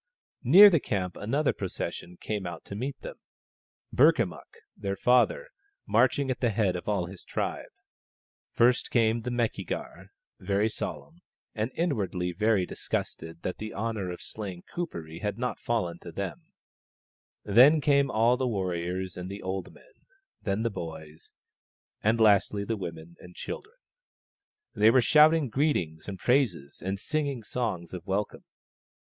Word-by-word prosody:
Near 190 - +9
the 165 - +4
camp 95 -8 -2
another 135 +8 0
procession 90 -2 -5
came 105 -4 -3
out 85 -2 -8
to 100 - -7
meet 130 +6 -4
them: - - -8 0.8
Burkamukk, 130 - +2 0.2
their 100 -1 -3
father, 125 - +2 0.4
marching 130 +4 +2
at 130 - -3
the 120 - +2
head 105 -4 +1
of 90 +3 -4
all 100 -4 0
his 90 +1 -11
tribe. - - -3 0.8
First 125 +1 +3
came 115 -1 +2
the 125 - -4
Meki 120 -5 -1
gar, - - -6 0.3
very 100 +3 +1
solemn, 165 +9 -6 0.3
and 110 +2 -2
inwardly 100 - -1
very 105 0 +2
disgusted 80 -1 -5
that 90 - -4
the 110 0 -6
honour 110 -3 -2
of 90 - -7
slaying 95 -5 -7
Kuperee 85 - -5
had 105 -1 -2
not 125 +1 -3
fallen 90 -8 -2
to 85 - -9
them; 95 +1 -6 0.9
then 130 +10 +6
came 140 -1 +3
all 120 +1 +3
the 130 0 0
warriors 90 -3 -2
and 90 +1 -6
the 100 +1 -7
old 95 0 -4
men, - - -20 0.5
then 100 +1 -1
the 115 - 0
boys, 80 -4 -9 0.7
and 110 +2 +2
lastly 105 -1 +4
the 115 - -1
women 85 -3 -8
and 90 0 -14
children. 430 +4 -7 1.0
They 110 - +5
were 125 +2 +5
shouting 155 +3 +5
greetings 105 - -1
and 95 - -5
praises 105 - 0
and 95 +1 -2
singing 140 -3 -2
songs 105 -8 -3
of 90 +1 -7
welcome. 100 +2 -2
105 Hz, 150 wpm, -28 LUFS, 90-125 Hz, 1.0 s, Near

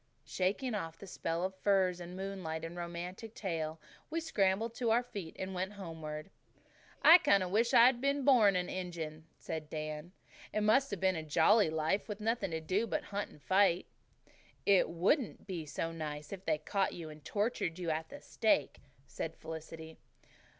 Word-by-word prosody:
Shaking 205 +7 -1
off 165 -6 -4
the - - -10
spell 170 -2 -3
of 190 +1 -1
firs 190 -3 +2
and 175 +1 -8
moonlight 185 -5 -4
and 165 +1 -7
romantic 175 +6 -6
tale, 160 -5 -3 0.3
we 330 - -1
scrambled 220 -7 +1
to 235 -1 -1
our 235 +2 +4
feet 200 -9 -7
and 190 0 -4
went 185 +2 -3
homeward. 160 -3 -7 0.7
"I 335 +3 +10
kind 200 - +4
of 180 - -4
wish 230 +4 +3
I'd 240 +1 +6
been 280 0 +1
born 220 -8 +6
an 180 -1 0
Injun," 165 -4 -5
said 155 -2 -5
Dan. 155 +2 -5 0.4
"It 215 - 0
must 240 +6 +4
have 200 - -4
been 190 0 +2
a 160 - -2
jolly 160 +6 +4
life 160 +8 0
nothing 225 -1 0
to 160 -1 -3
do 190 +8 0
but - - -1
hunt 205 0 -2
and 145 - -18
fight." 190 -2 +3 0.8
"It 195 -4 +5
wouldn't 190 - +1
be 175 -6 -5
so 165 +3 -3
nice 150 0 -5
if 190 -1 -8
they 155 -2 +2
caught 195 +5 -1
you 160 -3 -7
and 150 0 -13
tortured 205 - -1
you 175 -3 -2
at 160 +1 -3
the 285 - -10
stake," 215 - +1 0.3
said 160 +3 -5
Felicity. 160 0 -8
185 Hz, 180 wpm, -33 LUFS, 160-210 Hz, 0.8 s, I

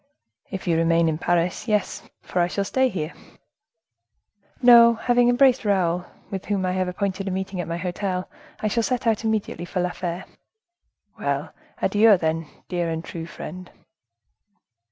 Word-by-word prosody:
"If 190 -1 -6
you 165 -2 +2
remain 165 0 +3
in 155 -1 -1
Paris, 175 +5 0
yes; 210 -3 0 0.2
for 180 - -2
I 175 - +3
shall 200 +3 -2
stay 260 +6 +1
here." 165 -6 -4 1.5
"No: 235 -2 +8
after 225 - -10
having 245 0 +4
embraced 255 +1 +4
Raoul, 180 -4 +1 0.3
with 190 -2 -4
whom 200 -2 -1
I 180 - 0
have 185 0 0
appointed 195 +1 -3
a - - 0
meeting 190 0 -3
at 170 - -6
my 170 0 -3
hotel, 180 +1 -3 0.3
I 215 - +1
shall 230 +3 +1
set 245 +1 -1
out 225 -1 +1
immediately 220 -5 -2
for 180 +1 -3
La 180 0 0
Fere." 175 -1 -4 0.9
"Well, - - -2 0.3
adieu, 210 -1 +5
then, 160 -1 -1 0.2
dear 175 -2 -1
and 160 0 -4
true 165 -1 -6
friend." 180 +1 -8
185 Hz, 165 wpm, -24 LUFS, 175-215 Hz, 1.5 s, No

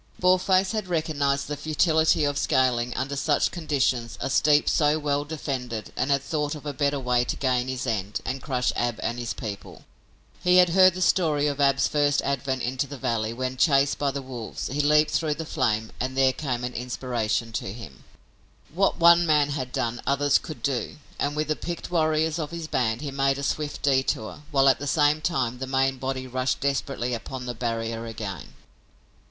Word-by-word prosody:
Boarface 185 +1 +3
had 215 -4 -3
recognized 145 -5 0
the 150 - -3
futility 160 +1 +2
of 145 -1 0
scaling, 125 -2 +1
under 135 +2 -2
such 145 +1 +1
conditions, 135 -8 -1
a - - -3
steep 145 +1 +4
so 150 0 +3
well 145 -1 -1
defended 130 -8 -5
and 130 - -1
had 140 -1 +2
thought 150 0 -2
of 150 - -11
a 145 - -3
better 140 +1 0
way 125 -1 +1
to - - -2
gain 130 -2 0
his 130 -1 -3
end 105 -4 -2
and 130 +1 -3
crush 125 -3 -1
Ab 120 -2 -1
and 120 +1 -2
his 120 -1 -4
people. 105 -3 -8 0.6
He 180 0 +4
had 180 -1 +6
heard 185 +1 +5
the 185 - 0
story 155 -6 +2
of 145 -1 -1
Ab's 140 -1 +3
first 145 -1 +1
advent 135 -1 -2
into 130 +3 -1
the 140 +1 -8
valley 110 -3 -1
when, 130 +2 -4
chased 140 -1 +3
by 145 - +1
the 135 0 -4
wolves, 125 -2 -6
he 145 - +1
leaped 150 +1 +4
through 155 -2 0
the 160 - -5
flame, 110 -8 -1
and 130 +1 -3
there 135 -1 +4
came 130 -5 -3
an 125 0 -3
inspiration 120 -2 -2
to 95 - -4
him! 85 - -11 0.7
What 195 +3 +2
one 170 0 +6
man 150 -2 +3
had 130 -3 -4
done 120 -3 -2
others 140 +1 +3
could 155 - -9
do, 135 -4 -2 0.2
and, 145 +1 -1
with 155 0 -2
picked 175 0 -5
warriors 160 -1 +1
of 150 -2 -3
his 170 -1 -6
band, 120 -5 0
he 145 -2 -4
made 135 0 +1
a 140 - -5
swift 145 +1 -3
detour, 130 -3 0
while, 135 -1 +3
at 135 - +4
the 145 - -5
same 150 +1 +3
time, 130 -6 -1
the 130 - -4
main 135 0 +1
body 130 0 -3
rushed 130 0 -1
desperately 135 -3 -1
upon 125 +2 -5
the 125 - -3
barrier 115 -1 -3
again. 105 -7 -7
140 Hz, 195 wpm, -25 LUFS, 125-150 Hz, 0.7 s, had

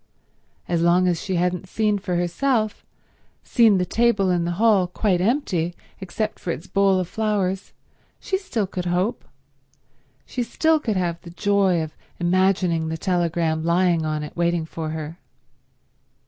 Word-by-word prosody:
As 170 -1 0
long 175 +2 +4
as 175 -2 0
she 190 -3 -2
hadn't 180 +1 -1
seen 210 -1 +1
for 185 -2 -3
herself, 215 +5 0 0.6
seen 225 -5 +4
the 180 - +1
table 215 -3 +2
in 175 -1 +1
the 175 - -1
hall 210 -4 +4
quite 180 0 0
empty 180 - 0 0.2
except 210 +3 -3
for - - -6
its 170 +1 -3
bowl 195 -1 +2
of 180 - -2
flowers, 200 -3 -1 0.5
she 385 - -2
still 245 - -2
could 185 -1 -5
hope, 185 +7 0 1.0
she 250 - -4
still 315 +6 +2
could 220 -9 -1
have 170 -2 -1
the 175 - -11
joy 190 -2 +2
of 155 - -8 0.2
imagining 180 -2 +2
the 160 0 -3
telegram 170 -3 0
lying 170 0 +2
on 155 -1 -2
it 150 - -8
waiting 170 -1 0
for 160 0 -5
her. 160 +2 -6
180 Hz, 155 wpm, -23 LUFS, 170-205 Hz, 1.0 s, long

